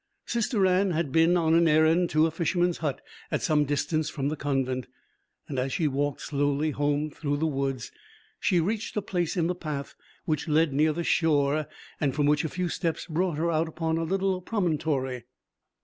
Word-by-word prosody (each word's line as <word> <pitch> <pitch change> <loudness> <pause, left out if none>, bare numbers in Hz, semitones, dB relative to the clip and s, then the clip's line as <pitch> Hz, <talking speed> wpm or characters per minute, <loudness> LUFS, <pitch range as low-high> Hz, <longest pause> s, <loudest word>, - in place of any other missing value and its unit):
Sister 230 -3 +1
Anne 185 +1 +3
had 160 -3 -1
been 165 +4 +4
on 160 -2 +2
an 170 0 +5
errand 160 +3 +4
to 155 +1 +3
a 165 - 0
fisherman's 175 +1 0
hut 150 -4 -2 0.3
at - - -2
some 150 -1 +3
distance 150 +2 0
from 140 -1 -2
the 155 - -2
convent. 135 -3 -1 0.7
As 130 +1 -1
she 160 - +1
walked 145 0 -1
slowly 145 +1 0
home 145 +1 0
through 145 -1 -2
the 160 - 0
woods, 135 -5 -2 0.5
she 180 - +2
reached 210 +6 -2
a - - +2
place 175 -1 -2
in 170 - +2
the 180 - +1
path 150 -5 -5 0.3
which 155 -1 -1
led 155 -1 +2
near 155 +3 +3
the 170 +3 -3
shore 150 -3 +2 0.3
and 140 -3 0
from 145 -1 +2
which 150 0 +3
a 160 - -2
few 180 +2 -2
steps 165 -1 -2
brought 170 -1 -1
her 170 +2 +1
out 160 +1 +1
upon 160 0 -2
a - - -1
little 190 +2 0
promontory. 150 - -1
155 Hz, 190 wpm, -27 LUFS, 145-170 Hz, 0.7 s, an